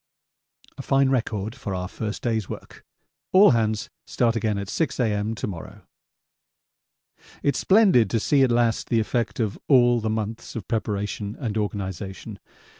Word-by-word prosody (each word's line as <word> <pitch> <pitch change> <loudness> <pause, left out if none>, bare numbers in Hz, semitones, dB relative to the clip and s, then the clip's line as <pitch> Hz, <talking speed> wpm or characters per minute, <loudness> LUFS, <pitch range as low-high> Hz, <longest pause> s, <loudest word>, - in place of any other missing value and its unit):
A - - -2
fine 135 0 +2
record 110 -5 -1
for 105 -7 -5
our 90 0 -3
first 105 +2 -5
day's 110 -4 -1
work. - - -9 0.5
All 200 +2 +8
hands 110 -2 0 0.2
start 115 -2 +1
again 110 -2 0
at 100 -1 -4
6 140 - -2
A.M. 110 -2 0
to - - -4
morrow. 90 -5 -8 1.6
It's 140 - +1
splendid 190 - +5
to 115 - +1
see 140 +5 +2
at 130 - +4
last 120 -1 +1
the 115 - +3
effect 115 +1 -1
of 110 -3 -1
all 120 -3 +5
the 110 -1 -2
months 110 +1 -4
of 110 -5 -6
preparation 105 -1 -3
and 115 -7 -3
organisation. 100 -2 -4
110 Hz, 155 wpm, -24 LUFS, 105-120 Hz, 1.6 s, All